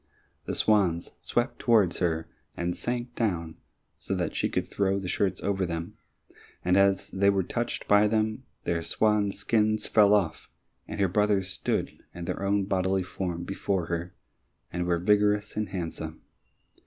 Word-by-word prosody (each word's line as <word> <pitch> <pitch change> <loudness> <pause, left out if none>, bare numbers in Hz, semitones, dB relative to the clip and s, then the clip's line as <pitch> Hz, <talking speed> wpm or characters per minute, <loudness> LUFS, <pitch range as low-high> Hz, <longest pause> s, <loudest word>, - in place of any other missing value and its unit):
The - - -2
swans 95 -6 +2
swept 120 +2 -1
towards 105 -7 +3
her 80 -2 0 0.3
and 85 0 -1
sank 120 0 -3
down 85 -8 -2 0.4
so - - -2
that - - -2
she - - 0
could - - -1
throw 100 -1 0
the 95 -2 -4
shirts 95 +1 0
over 95 -1 0
them, 85 -2 -4 0.7
and 90 +1 +3
as 100 0 +3
they 100 +1 +3
were 100 -1 +2
touched - - -3
by 105 +1 +5
them, 110 +2 0 0.2
their 85 -1 0
swan's 105 +3 +1
skins 110 -1 +1
fell 105 -1 +5
off, 95 -6 -1 0.4
and - - -6
her 100 - +4
brothers 100 0 +1
stood - - -2 0.2
in 85 -1 -5
their - - -3
own 100 0 +1
bodily 95 -1 +1
form 90 -2 -4
before 95 -1 -1
her, 85 +1 -4 0.6
and 90 0 -1
were 85 -1 +2
vigorous 105 +3 +2
and 105 -1 -2
handsome. 80 -3 -5
95 Hz, 160 wpm, -28 LUFS, 90-105 Hz, 0.7 s, by